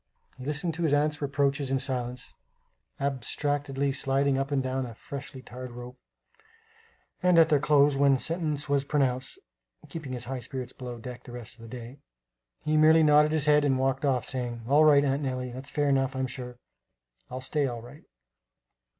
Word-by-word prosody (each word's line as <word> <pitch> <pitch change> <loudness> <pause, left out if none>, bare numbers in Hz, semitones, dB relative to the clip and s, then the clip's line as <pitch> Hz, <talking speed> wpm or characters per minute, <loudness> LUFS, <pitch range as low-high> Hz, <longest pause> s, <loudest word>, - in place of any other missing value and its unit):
He 130 - -10
listened 155 +4 -1
to 165 - -5
his 160 -4 +2
aunt's 150 +1 +1
reproaches 140 0 0
in 135 - +2
silence, 125 -2 -4 0.7
abstractedly 140 +1 -1
sliding 135 0 +1
up 135 +1 -1
and 140 -2 0
down 130 0 -2
a 115 - -10
freshly 140 +1 -8
tarred 125 0 -8
rope; 125 +1 -10 1.2
and, 180 -1 +4
at 165 -1 +7
their 150 -3 +4
close, 145 0 +4
when 140 -1 +4
sentence 155 -1 -2
was 140 -1 +2
pronounced 135 -2 0 0.5
(keeping 155 -6 -6
his 125 -2 -4
high 130 +1 -4
spirits 125 +1 -6
below 125 -2 -7
deck 125 +1 -8
the - - -12
rest 120 -2 -8
of - - -17
the 115 - -10
day), 120 +4 -10 0.7
he 155 0 +2
merely 160 +1 +6
nodded 150 0 +5
his 155 -2 +1
head 150 0 +5
and 135 -2 +2
walked 135 +1 0
off 130 -4 +1
saying: 120 -3 -4
"All 145 +4 +5
right, 145 -2 +6
Aunt 140 +1 0
Nellie, 130 -2 -3
that's 130 +3 -7
fair 145 -1 0
enough, 135 0 +1
I - - -3
am - - +1
sure; 125 -1 -7 0.7
I'll 130 - -5
stay 140 +2 0
all 120 -2 -5
right." 140 +5 -13
135 Hz, 185 wpm, -28 LUFS, 130-145 Hz, 1.2 s, at